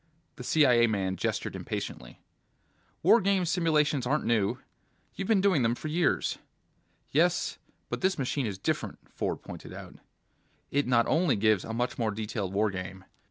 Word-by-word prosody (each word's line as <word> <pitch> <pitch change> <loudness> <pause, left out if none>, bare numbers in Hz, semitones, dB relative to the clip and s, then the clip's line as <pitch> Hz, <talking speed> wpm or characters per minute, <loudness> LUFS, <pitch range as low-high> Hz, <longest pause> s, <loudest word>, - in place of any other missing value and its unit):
The 125 - -7
CIA 125 -4 +4
man 95 -4 -1
gestured - - -2
impatiently. - - -6 0.8
"War 235 - +6
games 190 -3 +1
simulations 150 -6 +2
aren't 150 +4 0
new. 110 -4 +1 0.6
You've 195 - -4
been 215 -4 +3
doing 190 -8 +3
them 115 0 +2
for 155 - -6
years." 165 +2 +1 0.7
"Yes, 170 +4 +1 0.3
but - - -4
this 190 0 +1
machine 135 -2 -1
is 100 -3 -4
different," - - -2 0.2
Ford - - -3
pointed - - -9
out. - - -9 0.8
"It 140 -1 +1
not 115 -2 +4
only 160 -3 +2
gives 105 -2 +2
a - - -6
much 120 +3 -2
more 115 -2 +1
detailed 105 -2 -3
war 105 +1 +1
game. 95 0 -7
125 Hz, 160 wpm, -29 LUFS, 105-160 Hz, 0.8 s, War